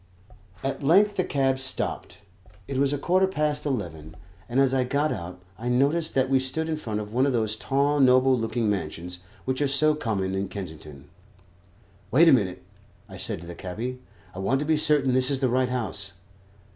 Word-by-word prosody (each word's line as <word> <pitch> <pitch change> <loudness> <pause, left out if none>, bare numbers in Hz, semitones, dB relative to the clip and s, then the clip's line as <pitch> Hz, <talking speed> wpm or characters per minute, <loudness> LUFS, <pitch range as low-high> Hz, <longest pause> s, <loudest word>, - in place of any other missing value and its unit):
At 135 +2 -3
length 200 +8 +4
the 185 - +1
cab 135 -3 0
stopped. 105 -7 -2 0.4
It 135 -1 -2
was 140 0 +2
a 145 - 0
quarter 185 +6 +2
past 150 -4 -1
eleven, 80 - -4 0.3
and 125 +3 +1
as 135 -1 +3
I 130 -1 +2
got 140 +4 0
out 90 -1 -6 0.2
I 120 +2 -3
noticed 145 +6 +1
that 130 -1 +3
we 135 0 +3
stood 145 +5 -3
in 160 - -1
front 110 -8 -4
of 105 0 -7
one 130 +3 +3
of 135 - 0
those 110 -2 0
tall 140 +5 +1
noble 130 0 +5
looking 115 -1 -1
mansions 90 -2 -3 0.3
which 130 +1 -1
are 145 - +3
so 150 +3 +3
common 100 -10 -2
in 95 +1 -2
Kensington. 80 -7 -9 1.0
"Wait 150 - +5
a - - +8
minute," 95 -7 0 0.4
I 95 -3 -10
said 100 -3 -2
to - - -10
the 85 - -8
cabby; 115 +9 -5 0.3
"I 95 - -8
want 120 +8 +1
to - - -2
be 155 +1 +2
certain 145 -3 +2
this 130 0 +3
is 140 -2 0
the 130 -2 +1
right 130 +1 +1
house." 100 -6 -4
130 Hz, 195 wpm, -25 LUFS, 100-140 Hz, 1.0 s, a